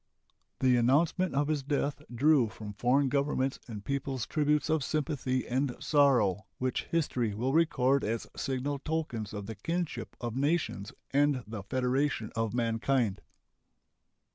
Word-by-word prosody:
The 125 Hz, -1 st, +4 dB
announcement 150 Hz, +8 st, +2 dB
of 145 Hz, +1 st, +2 dB
his 150 Hz, -2 st, 0 dB
death 145 Hz, +1 st, -1 dB
drew 130 Hz, -1 st, +4 dB
from 105 Hz, -1 st, -8 dB
foreign 130 Hz, +6 st, +2 dB
governments 135 Hz, 0 st, 0 dB
and 105 Hz, -4 st, -7 dB
peoples 135 Hz, -3 st, -2 dB
tributes 150 Hz, 0 st, +1 dB
of 155 Hz, -2 st, +1 dB
sympathy 140 Hz, -5 st, -1 dB
and 130 Hz, +1 st, 0 dB
sorrow 125 Hz, -, +3 dB
which 130 Hz, -1 st, -1 dB
history 125 Hz, -10 st, 0 dB
will 125 Hz, +5 st, -1 dB
record 140 Hz, -5 st, +3 dB
as 115 Hz, +2 st, -2 dB
signal 135 Hz, +1 st, -2 dB
tokens 140 Hz, -9 st, -3 dB
of 105 Hz, -1 st, -5 dB
the 110 Hz, -, -5 dB
kinship 165 Hz, -, -3 dB
of 120 Hz, -2 st, -4 dB
nations 140 Hz, -, 0 dB, 0.2 s
and 140 Hz, -2 st, +2 dB
the 110 Hz, -1 st, -6 dB
federation 130 Hz, +2 st, 0 dB
of 115 Hz, -1 st, 0 dB
mankind. 115 Hz, -2 st, 0 dB
130 Hz, 140 wpm, -30 LUFS, 115-145 Hz, 0.2 s, The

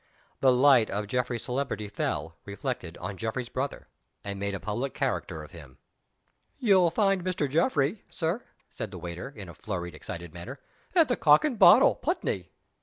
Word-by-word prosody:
The 130 Hz, -, +5 dB
light 125 Hz, -3 st, +5 dB
of 105 Hz, +1 st, -2 dB
Geoffrey's 125 Hz, +2 st, -2 dB
celebrity 125 Hz, -4 st, -2 dB
fell, 80 Hz, -5 st, -3 dB
reflected, 100 Hz, -, -5 dB
on 95 Hz, +2 st, -6 dB
Geoffrey's 115 Hz, +3 st, -3 dB
brother, 135 Hz, +3 st, -4 dB, 0.4 s
and 100 Hz, -1 st, -5 dB
made 100 Hz, 0 st, -2 dB
a -, -, -4 dB
public 115 Hz, +8 st, -3 dB
character 80 Hz, -1 st, -2 dB
of 75 Hz, -, -13 dB
him. 70 Hz, -7 st, -13 dB, 0.8 s
"You'll 190 Hz, -7 st, +4 dB
find 195 Hz, -1 st, +1 dB
Mr. 180 Hz, -5 st, -1 dB
Geoffrey, 160 Hz, -, +1 dB
Sir," 175 Hz, +8 st, -2 dB, 0.2 s
said 110 Hz, -, -6 dB
the 95 Hz, -, -9 dB
waiter, 85 Hz, +6 st, -6 dB
in 105 Hz, -8 st, -10 dB
a 85 Hz, -, -10 dB
flurried, 85 Hz, 0 st, -5 dB
excited 85 Hz, -1 st, -8 dB
manner, 115 Hz, +11 st, -8 dB, 0.4 s
"at 330 Hz, -4 st, +6 dB
the 245 Hz, -, +1 dB
Cock 150 Hz, -, +5 dB
and 260 Hz, -7 st, -2 dB
Bottle, -, -, +8 dB
Putney." -, -, -2 dB
120 Hz, 170 wpm, -28 LUFS, 95-150 Hz, 0.8 s, Bottle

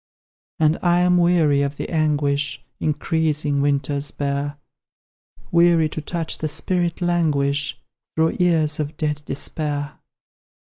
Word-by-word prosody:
And 155 Hz, 0 st, +3 dB
I 175 Hz, 0 st, +3 dB
am 180 Hz, 0 st, +4 dB
weary 165 Hz, -5 st, +3 dB
of 140 Hz, 0 st, -2 dB
the -, -, -4 dB
anguish 145 Hz, -3 st, 0 dB, 0.2 s
Increasing 150 Hz, -1 st, 0 dB
winters 140 Hz, 0 st, 0 dB
bear; 140 Hz, 0 st, -3 dB, 0.9 s
Weary 170 Hz, -2 st, +4 dB
to 155 Hz, -, -6 dB
watch 170 Hz, -2 st, 0 dB
the 155 Hz, -, -2 dB
spirit 175 Hz, +2 st, -1 dB
languish 145 Hz, -5 st, +1 dB, 0.4 s
Through 160 Hz, 0 st, +1 dB
years 160 Hz, -4 st, +2 dB
of 150 Hz, 0 st, -3 dB
dead 150 Hz, -3 st, -2 dB
despair. 145 Hz, 0 st, -3 dB
150 Hz, 120 wpm, -22 LUFS, 145-165 Hz, 0.9 s, am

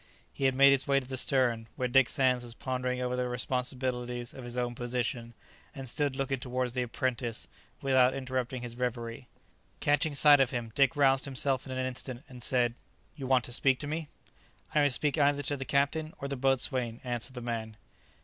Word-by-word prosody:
He 135 Hz, -, -2 dB
had 130 Hz, -1 st, +3 dB
made 140 Hz, +1 st, +7 dB
his 135 Hz, 0 st, +2 dB
way 140 Hz, -1 st, +4 dB
to 130 Hz, -, -10 dB
the 130 Hz, -, -4 dB
stern, 120 Hz, -4 st, +1 dB
where 125 Hz, -, -1 dB
Dick 125 Hz, 0 st, +4 dB
Sands 125 Hz, -2 st, +2 dB
was 120 Hz, -1 st, -8 dB
pondering 125 Hz, 0 st, -2 dB
over 125 Hz, 0 st, -1 dB
the 125 Hz, 0 st, -1 dB
responsibilities 125 Hz, -1 st, -2 dB
of 130 Hz, -, -9 dB
his 120 Hz, 0 st, -5 dB
own 120 Hz, -1 st, -1 dB
position, 120 Hz, -1 st, -3 dB, 0.4 s
and 135 Hz, -1 st, -7 dB
stood 140 Hz, +2 st, -1 dB
looking 135 Hz, -1 st, -1 dB
towards 125 Hz, -1 st, -2 dB
the 125 Hz, -, -1 dB
apprentice 120 Hz, -1 st, -2 dB, 0.4 s
without 130 Hz, -1 st, +4 dB
interrupting 130 Hz, -1 st, -3 dB
his 120 Hz, -1 st, -6 dB
reverie. 120 Hz, -1 st, -4 dB, 0.5 s
Catching 145 Hz, +1 st, +1 dB
sight 145 Hz, 0 st, +8 dB
of 135 Hz, -3 st, +4 dB
him, 120 Hz, -3 st, -4 dB
Dick 140 Hz, +4 st, +3 dB
roused 135 Hz, -1 st, +3 dB
himself 135 Hz, -1 st, 0 dB
in -, -, -7 dB
an 130 Hz, 0 st, -2 dB
instant, 130 Hz, 0 st, -5 dB
and 125 Hz, -2 st, -12 dB
said, 120 Hz, -1 st, +2 dB, 0.4 s
"You 135 Hz, -4 st, -6 dB
want 130 Hz, -2 st, +3 dB
to 120 Hz, -, -4 dB
speak 135 Hz, +1 st, +3 dB
to -, -, -3 dB
me?" 155 Hz, +1 st, -3 dB, 0.7 s
"I 150 Hz, -, +4 dB
must 145 Hz, -3 st, +4 dB
speak 150 Hz, +1 st, 0 dB
either 145 Hz, 0 st, +3 dB
to 145 Hz, +1 st, -1 dB
the 135 Hz, -1 st, -5 dB
captain 150 Hz, +4 st, 0 dB
or 140 Hz, -, -5 dB
the 140 Hz, -, -3 dB
boatswain," 130 Hz, -2 st, 0 dB
answered 125 Hz, +1 st, -4 dB
the 125 Hz, -, -5 dB
man. 115 Hz, -2 st, -4 dB
130 Hz, 200 wpm, -30 LUFS, 125-135 Hz, 0.7 s, sight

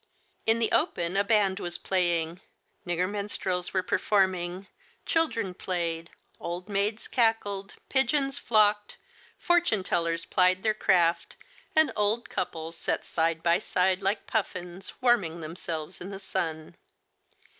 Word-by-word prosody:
In 225 Hz, +1 st, +4 dB
the 230 Hz, -1 st, 0 dB
open 170 Hz, +2 st, +1 dB
a 200 Hz, -, +3 dB
band 205 Hz, -3 st, +2 dB
was 175 Hz, -2 st, -5 dB
playing, 175 Hz, -2 st, 0 dB, 0.5 s
nigger 175 Hz, +1 st, +1 dB
min 205 Hz, +1 st, -3 dB
strels 180 Hz, -3 st, -2 dB
were 185 Hz, -1 st, 0 dB
performing, 185 Hz, -2 st, +1 dB, 0.4 s
children 230 Hz, -, 0 dB
played, 170 Hz, -3 st, -3 dB, 0.3 s
old 175 Hz, +2 st, -5 dB
maids 210 Hz, +2 st, -1 dB
cackled, 205 Hz, -5 st, 0 dB
pigeons 275 Hz, +1 st, +1 dB
flocked, 210 Hz, -4 st, +2 dB, 0.4 s
fortune 345 Hz, -, +2 dB
tellers 170 Hz, -2 st, -1 dB
plied 185 Hz, 0 st, +2 dB
their 215 Hz, -1 st, +3 dB
craft, 170 Hz, -5 st, +2 dB, 0.4 s
and 315 Hz, 0 st, +5 dB
old 210 Hz, +3 st, +1 dB
couples 165 Hz, 0 st, -4 dB
sat -, -, -1 dB
side 165 Hz, 0 st, 0 dB
by 170 Hz, +1 st, +4 dB
side 185 Hz, -1 st, +1 dB
like 200 Hz, +2 st, 0 dB
pufiins, 185 Hz, -4 st, -3 dB
warming 205 Hz, -10 st, +2 dB
themselves 160 Hz, +1 st, -5 dB
in 185 Hz, -, -6 dB
the 195 Hz, -, -6 dB
sun. 165 Hz, -5 st, -4 dB
190 Hz, 130 wpm, -28 LUFS, 175-210 Hz, 0.5 s, and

